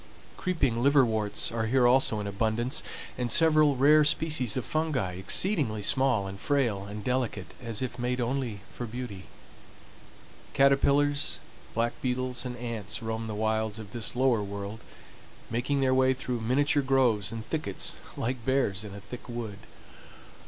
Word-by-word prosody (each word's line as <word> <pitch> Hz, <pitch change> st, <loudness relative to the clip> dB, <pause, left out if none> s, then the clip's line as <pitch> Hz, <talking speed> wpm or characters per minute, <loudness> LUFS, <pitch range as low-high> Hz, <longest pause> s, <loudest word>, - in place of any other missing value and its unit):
Creeping 140 Hz, -10 st, 0 dB
liverworts 120 Hz, -8 st, +2 dB
are 115 Hz, -1 st, -1 dB
here 125 Hz, +1 st, +3 dB
also 120 Hz, -3 st, +4 dB
in 105 Hz, -, -4 dB
abundance, 110 Hz, +5 st, -1 dB, 0.4 s
and 125 Hz, -1 st, -1 dB
several 155 Hz, -3 st, +5 dB
rare 150 Hz, +4 st, +6 dB
species 150 Hz, -6 st, +1 dB
of 130 Hz, -, -2 dB
fungi, 155 Hz, -, -1 dB
exceedingly 110 Hz, -, +1 dB
small, 130 Hz, -3 st, +3 dB
and 95 Hz, 0 st, -7 dB
frail, 120 Hz, -8 st, 0 dB
and 105 Hz, +1 st, -7 dB
delicate, 125 Hz, -6 st, -2 dB
as 115 Hz, 0 st, -2 dB
if 125 Hz, -1 st, -5 dB
made 125 Hz, +1 st, -1 dB
only 120 Hz, -4 st, -2 dB
for 120 Hz, -, -5 dB
beauty. 115 Hz, -5 st, -7 dB, 1.3 s
Caterpillars, 140 Hz, +1 st, +3 dB, 0.4 s
black 115 Hz, +1 st, +1 dB
beetles, 125 Hz, 0 st, -1 dB
and 125 Hz, 0 st, -6 dB
ants 115 Hz, -2 st, -4 dB
roam 110 Hz, 0 st, -3 dB
the 110 Hz, -, -4 dB
wilds 110 Hz, 0 st, 0 dB
of 110 Hz, -2 st, -9 dB
this 120 Hz, 0 st, -2 dB
lower 125 Hz, -3 st, +3 dB
world, 100 Hz, +2 st, -6 dB, 0.7 s
making 130 Hz, +4 st, 0 dB
their 130 Hz, -1 st, +3 dB
way 130 Hz, 0 st, +3 dB
through 125 Hz, -2 st, -3 dB
miniature 145 Hz, +5 st, +2 dB
groves 125 Hz, -7 st, +2 dB
and 115 Hz, 0 st, -6 dB
thickets 150 Hz, -, -2 dB, 0.2 s
like 120 Hz, 0 st, -2 dB
bears 120 Hz, -6 st, +1 dB
in 100 Hz, -2 st, -8 dB
a -, -, -7 dB
thick 120 Hz, +5 st, -10 dB
wood. 115 Hz, -4 st, -5 dB
120 Hz, 150 wpm, -28 LUFS, 110-135 Hz, 1.3 s, rare